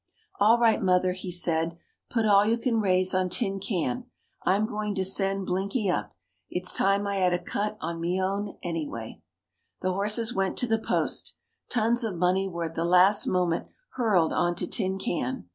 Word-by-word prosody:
"All 220 +3 +6
right, 230 -2 +3
mother," 180 0 +3
he 185 0 -6
said. 165 -1 0 0.3
"Put 230 -2 0
all 200 -1 +6
you 225 +2 +2
can 235 -1 0
raise 185 -1 +2
on 185 0 +1
Tin 195 -2 -1
Can. 205 +6 -2 0.4
I'm 200 +3 +2
going 210 -2 -3
to 190 -1 0
send 195 0 0
Blinky 195 +3 -1
up. 105 -9 -3 0.3
It's 180 0 -1
time 195 +1 +2
I 200 0 -1
had 180 -2 +3
a - - -2
cut 210 +4 -3
on 165 +1 -4
me 175 +2 0
own, 200 +2 -2
anyway." 150 -10 -5 0.6
The 185 0 0
horses 215 +4 0
went 195 0 -1
to 245 - 0
the 225 -1 +1
post. - - -1 0.3
Tons 240 +1 +2
of 215 -5 -2
money 180 +3 +1
were 170 -2 -4
at 165 -1 -4
the 165 - -2
last 180 +4 +4
moment 180 -2 0 0.2
hurled 200 -10 +2
on 175 -1 +1
to - - -2
Tin 190 -2 -1
Can. 130 - -3
190 Hz, 185 wpm, -27 LUFS, 180-210 Hz, 0.6 s, All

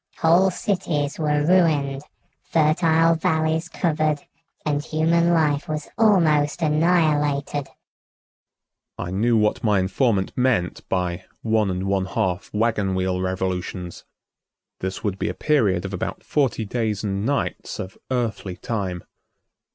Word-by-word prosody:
Whole 175 +4 +4
cities 165 -7 -2
were 150 -1 +1
ruined, 150 -6 +2 0.4
fertile 165 +1 +3
valleys 160 0 0
covered 155 -4 0 0.4
and 145 -1 0
human 165 +2 +2
life 150 -3 +2
was 150 -1 -4
almost 165 -8 +3
annihilated." 150 -3 +1 1.3
I 90 - -5
knew 115 +5 +2
what 105 0 +1
my 105 -3 +3
informant 95 +2 0
meant 125 -9 +1
by 90 -1 -2 0.2
"one 110 -2 +2
and 90 0 -2
one 95 -1 0
half 95 -1 -2
wagon 105 -3 0
wheel 95 0 -1
revolutions." 90 -1 -3 0.8
This 95 +2 -4
would 100 -3 -2
be - - -1
a - - -4
period 105 - +1
of 100 - -5
about 90 - -4
forty 130 -6 0
days 110 -2 -2
and 100 -1 -2
nights 140 +4 -2
of 95 0 -6
earthly 115 -7 -2
time. 95 -6 -3
135 Hz, 125 wpm, -23 LUFS, 95-155 Hz, 1.3 s, Whole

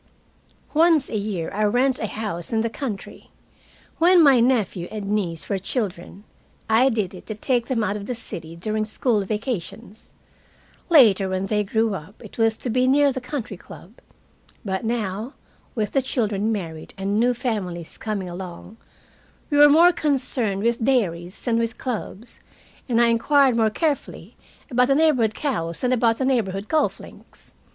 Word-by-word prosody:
Once 320 -2 +3
a - - -3
year 200 -5 -3
I 210 +2 0
rent 250 +5 +2
a 220 - -2
house 200 -6 -4
in 225 -1 +1
the 230 0 -2
country. 230 -8 -7 0.7
When 350 +1 +6
my 275 -4 +6
nephew 220 -8 +1
and 205 -2 -5
niece 175 -6 -2
were 195 - -1
children, 195 -2 -4 0.4
I 230 +4 +4
did 215 -6 -2
it 185 - -12
to 215 - -4
take 240 +2 0
them 240 -5 0
out 205 - -1
of 200 -1 -6
the 250 - -3
city 165 -7 -8
during 215 +5 -2
school 215 0 0
vacations. 215 0 -5 0.8
Later, 215 - +5
when 185 +1 -2
they 210 +1 0
grew 220 +2 0
up, 190 +2 -8
it 215 - -12
was 225 -1 +2
to 245 - -4
be 255 +2 +2
near 285 +1 +4
the 260 - -4
country 250 -6 -5
club. 185 +2 -14 0.7
But 190 0 -2
now, 225 +1 -3 0.4
with 215 -3 -1
the 270 - +2
children 220 -5 -1
married 165 -7 -6
and 200 +2 -1
new 245 +1 +2
families 190 - -4
coming 210 -4 -3
along, 180 +4 -9 0.7
we 290 - +3
were 295 0 +9
more 335 +4 +6
concerned 250 - 0
with 235 0 0
dairies 185 -8 0
than 230 -1 0
with 230 -1 -2
clubs, 235 -2 -6 0.5
and 235 -1 +2
I 235 0 +5
inquired 265 +2 +3
more 225 -1 +3
carefully 290 +6 -3 0.4
about 250 0 +3
the 275 - +3
neighborhood 265 -9 +2
cows 170 - -2
than 250 - +1
about 230 -2 +2
the 265 - -1
neighborhood 210 -6 -1
golf 315 -1 0
links. - - -15
220 Hz, 170 wpm, -23 LUFS, 195-255 Hz, 0.8 s, were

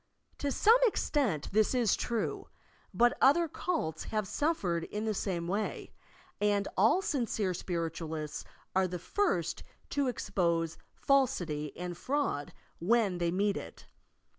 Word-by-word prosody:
To 285 - -1
some 450 - +5
extent 255 - 0
this 215 +4 +3
is 235 -5 +3
true, 235 -2 -2 0.4
but 240 +1 +3
other 330 +6 +5
cults 300 - -2
have 215 -3 -2
suffered 185 - 0
in 210 +1 -4
the 220 - 0
same 175 -4 -2
way, 205 +4 -3 0.5
and 205 -1 +2
all 225 - +4
sincere 230 - 0
spiritualists 165 -3 -4 0.3
are 190 0 +3
the 180 0 -4
first 405 - 0 0.3
to 285 -2 +1
expose 170 -8 0 0.2
falsity 180 - +1
and 175 0 -4
fraud 255 - -1 0.3
when 200 -1 +2
they 170 -1 +1
meet 200 +3 +1
it. - - -9
205 Hz, 130 wpm, -31 LUFS, 170-255 Hz, 0.5 s, some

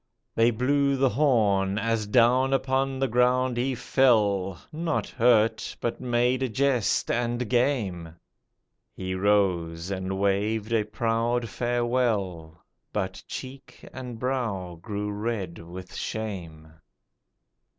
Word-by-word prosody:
They 115 +1 +4
blew 140 +4 +1
the 135 0 +3
horn, 105 -7 +2
As 110 -1 0
down 125 +4 +4
upon 135 0 0
the 135 0 +1
ground 125 +1 +2
he 130 +2 0
fell, 105 -8 +2
Not 165 0 -2
hurt, 115 -2 +2
but 120 - -3
made 125 +1 +1
a 130 - 0
jest 130 -1 +1
and 120 0 -1
game; 105 - 0 0.8
He 95 0 -4
rose, 95 -3 +1
and 95 0 -3
waved 105 +3 0
a 110 -2 +2
proud 115 +2 0
farewell, 115 -10 -1 0.3
But - - -3
cheek 130 -1 -9
and 125 -2 -7
brow 115 -8 -2
grew 105 +1 -4
red 105 -5 -3
with 90 +3 -10
shame. 85 -8 -6
115 Hz, 115 wpm, -26 LUFS, 100-125 Hz, 0.8 s, They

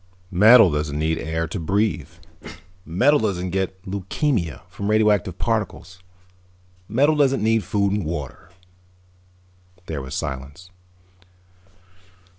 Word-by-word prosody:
Metal 105 +1 +7
doesn't 75 0 -2
need 80 +1 0
air 80 +1 -2
to 100 - -5
breathe. 95 -2 -1 0.8
Metal 130 - +3
doesn't 95 -4 -2
get 95 0 -2
leukemia 95 - -2
from 100 +1 -5
radioactive 105 -4 +2
particles. 105 -5 -3 0.9
Metal 140 +8 +3
doesn't 135 -5 +2
need 110 -1 +2
food 100 -1 0
and 105 0 -1
water." 80 +1 -6 1.4
There 75 -5 -4
was 65 +1 -7
silence. 75 +5 -6
95 Hz, 105 wpm, -22 LUFS, 80-110 Hz, 1.4 s, Metal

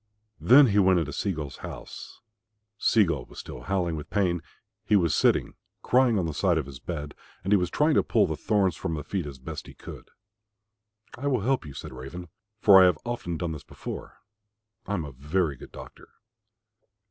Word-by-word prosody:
Then 135 +4 +7
he 105 -4 +2
went 95 -2 +5
into 75 -4 -1
Sea 100 +7 -1
gull's 75 -6 -6
house. - - -9 0.6
Sea 110 -1 +4
gull 85 -3 -2
was - - -16
still - - -8
howling 85 +4 -1
with 75 -1 -7
pain; 90 -5 +1 0.4
he 105 0 +2
was 85 -6 +3
sitting - - +2 0.3
crying 125 -3 +3
on 90 - 0
the 80 - -3
side 85 +2 +2
of 80 - -1
his 65 -2 -10
bed 75 -2 -5 0.3
and 100 - +1
he - - +7
was 90 -2 -1
trying 150 - +2
to - - +4
pull - - +2
the - - -2
thorns 100 -5 +1
from 80 - -3
his 75 -2 -6
feet 90 -1 -3
as 70 -2 -8
best 65 - -8
he - - -12
could. - - -11 1.1
"I 140 - -2
will 130 -6 +1
help 125 - 0
you," 70 - -10
said 70 - -8
Raven, 75 +8 -8 0.3
"for 95 -2 +8
I - - +8
have 90 -4 +2
often 120 -9 -3
done 85 -1 -3
this 75 -3 -7
before. - - -9 0.6
I 105 - -1
am 85 -5 -3
a 70 - -8
very 75 +4 -1
good - - -13
doctor." - - -12
90 Hz, 205 wpm, -27 LUFS, 75-100 Hz, 1.1 s, for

